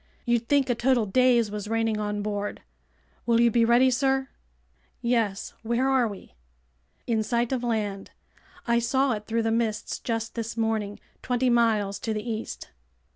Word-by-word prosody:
You'd 235 Hz, -1 st, +1 dB
think 280 Hz, -2 st, +3 dB
a 245 Hz, -, +2 dB
total 240 Hz, -1 st, +2 dB
daze 240 Hz, +1 st, +3 dB
was 210 Hz, 0 st, -5 dB
reigning 225 Hz, -1 st, 0 dB
on 210 Hz, -1 st, -2 dB
board. 205 Hz, -1 st, -4 dB, 0.6 s
Will 230 Hz, -1 st, +4 dB
you 235 Hz, 0 st, +5 dB
be 235 Hz, +1 st, +3 dB
ready, 240 Hz, +3 st, +5 dB
sir?" 265 Hz, +1 st, +1 dB, 0.7 s
"Yes. 230 Hz, -5 st, -1 dB
Where 235 Hz, +3 st, 0 dB
are 260 Hz, -3 st, +3 dB
we?" 200 Hz, -, -10 dB, 0.7 s
"In 225 Hz, -2 st, +1 dB
sight 235 Hz, +2 st, 0 dB
of 255 Hz, -2 st, -1 dB
land. 210 Hz, -4 st, -2 dB, 0.6 s
I 235 Hz, -1 st, +3 dB
saw 265 Hz, +3 st, +1 dB
it 210 Hz, -2 st, -4 dB
through 230 Hz, 0 st, 0 dB
the 225 Hz, -, 0 dB
mists 225 Hz, -2 st, -1 dB
just 225 Hz, -1 st, -3 dB
this 230 Hz, 0 st, -5 dB
morning, 220 Hz, -2 st, -1 dB, 0.2 s
twenty 250 Hz, 0 st, +1 dB
miles 220 Hz, -4 st, +2 dB
to 220 Hz, -1 st, -3 dB
the 215 Hz, +3 st, -4 dB
east." 225 Hz, -1 st, -5 dB
230 Hz, 165 wpm, -26 LUFS, 215-245 Hz, 0.7 s, you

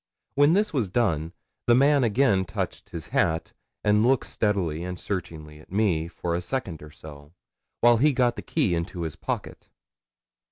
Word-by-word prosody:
When 145 Hz, +3 st, +4 dB
this 205 Hz, +1 st, +1 dB
was 120 Hz, -9 st, 0 dB
done, 85 Hz, -8 st, 0 dB, 0.4 s
the 120 Hz, -, +6 dB
man 140 Hz, +1 st, +4 dB
again 115 Hz, -4 st, +3 dB
touched 85 Hz, -, -5 dB
his -, -, -7 dB
hat, 80 Hz, 0 st, 0 dB, 0.3 s
and 105 Hz, +1 st, +3 dB
looked 130 Hz, +1 st, +3 dB
steadily 90 Hz, -7 st, -1 dB
and 90 Hz, 0 st, -5 dB
searchingly 80 Hz, -6 st, -5 dB
at 75 Hz, -, -18 dB
me 95 Hz, -6 st, +1 dB
for 85 Hz, 0 st, -4 dB
a 85 Hz, -, -1 dB
second 95 Hz, -, -4 dB
or 75 Hz, -, -10 dB
so, 75 Hz, 0 st, -13 dB, 0.5 s
while 120 Hz, 0 st, +6 dB
he 150 Hz, +6 st, +4 dB
got 125 Hz, -3 st, +2 dB
the -, -, -6 dB
key 140 Hz, -, 0 dB
into 85 Hz, +1 st, -3 dB
his 80 Hz, -2 st, -4 dB
pocket. -, -, -5 dB
95 Hz, 170 wpm, -26 LUFS, 80-125 Hz, 0.5 s, the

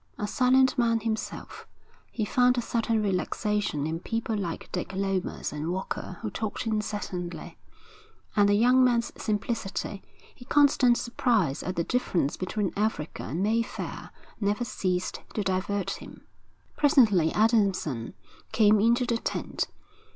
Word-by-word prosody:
A 210 Hz, -, -2 dB
silent 255 Hz, +3 st, +3 dB
man 230 Hz, -1 st, +2 dB
himself, 220 Hz, 0 st, -4 dB, 0.4 s
he 215 Hz, -, -2 dB
found 250 Hz, +3 st, +3 dB
a -, -, +2 dB
certain 225 Hz, -2 st, 0 dB
relaxation 205 Hz, -4 st, -1 dB
in 160 Hz, +1 st, -2 dB
people 225 Hz, +3 st, -2 dB
like 180 Hz, -5 st, -4 dB
Dick 180 Hz, +1 st, -4 dB
Lomas 195 Hz, -4 st, -2 dB
and 150 Hz, +3 st, -3 dB
Walker 185 Hz, -1 st, -4 dB
who 215 Hz, -, -3 dB
talked 215 Hz, +3 st, -4 dB
incessantly; 210 Hz, -5 st, -4 dB, 0.8 s
and 205 Hz, -1 st, +5 dB
the 205 Hz, -, +4 dB
young 250 Hz, +4 st, +5 dB
man's 240 Hz, -2 st, +2 dB
simplicity, 205 Hz, -2 st, -2 dB, 0.3 s
his 245 Hz, -, -15 dB
constant 275 Hz, -4 st, +4 dB
surprise 220 Hz, -, +1 dB
at 185 Hz, -, -4 dB
the 170 Hz, -, 0 dB
difference 175 Hz, -, 0 dB
between 190 Hz, +1 st, -2 dB
Africa 210 Hz, -7 st, -2 dB
and 165 Hz, +7 st, -3 dB
Mayfair, 225 Hz, +2 st, -2 dB, 0.3 s
never 210 Hz, +3 st, 0 dB
ceased 185 Hz, -4 st, -2 dB
to 210 Hz, -, 0 dB
divert 195 Hz, +1 st, -1 dB
him. -, -, -9 dB, 0.5 s
Presently 225 Hz, -, +4 dB
Adamson 195 Hz, -, +1 dB, 0.4 s
came 215 Hz, -1 st, +5 dB
into 235 Hz, +4 st, +3 dB
the 235 Hz, -1 st, 0 dB
tent. -, -, -2 dB
210 Hz, 135 wpm, -27 LUFS, 185-235 Hz, 0.8 s, and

